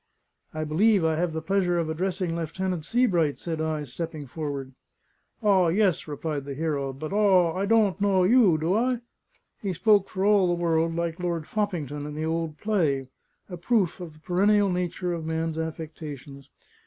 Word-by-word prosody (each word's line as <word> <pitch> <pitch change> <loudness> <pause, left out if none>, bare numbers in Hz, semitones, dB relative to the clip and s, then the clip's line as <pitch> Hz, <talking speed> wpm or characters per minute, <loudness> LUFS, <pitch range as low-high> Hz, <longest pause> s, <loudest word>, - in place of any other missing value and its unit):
"I 155 0 -3
believe 185 +5 +3
I 160 -1 +2
have 175 0 0
the 160 0 -4
pleasure 180 -1 +1
of 165 -2 0
addressing 175 +1 -2
Lieutenant 170 +1 -3
Sebright," 180 - +2
said 165 -2 -4
I, 155 -1 -1
stepping 155 +3 -6
forward. 140 -1 -5 0.7
"Aw, 195 -4 +4
yes," 185 0 +1
replied 150 -1 -4
the 140 -1 -5
hero; 145 -3 -2
"but, 155 +6 -6
aw! 190 -5 +4
I 195 +2 -1
dawn't 210 -3 +3
knaw 195 -2 +3
you, 200 -4 +5
do 160 +4 0
I?" 245 +3 +1 0.6
(He 195 -3 -2
spoke 205 +2 +3
for 190 0 -2
all 205 -3 +4
the 175 -1 0
world 165 -1 +1
like 170 0 -2
Lord 170 -3 -2
Foppington 155 -9 -3
in 150 - -7
the 155 +1 -2
old 160 -1 -2
play 150 -11 0 0.4
a 180 - -7
proof 190 -1 +1
of 175 -3 -8
the 155 - -19
perennial 200 +4 +2
nature 180 0 -2
of 165 -2 -4
man's 160 0 -2
affectations. 150 -4 -7
170 Hz, 175 wpm, -26 LUFS, 155-190 Hz, 0.7 s, you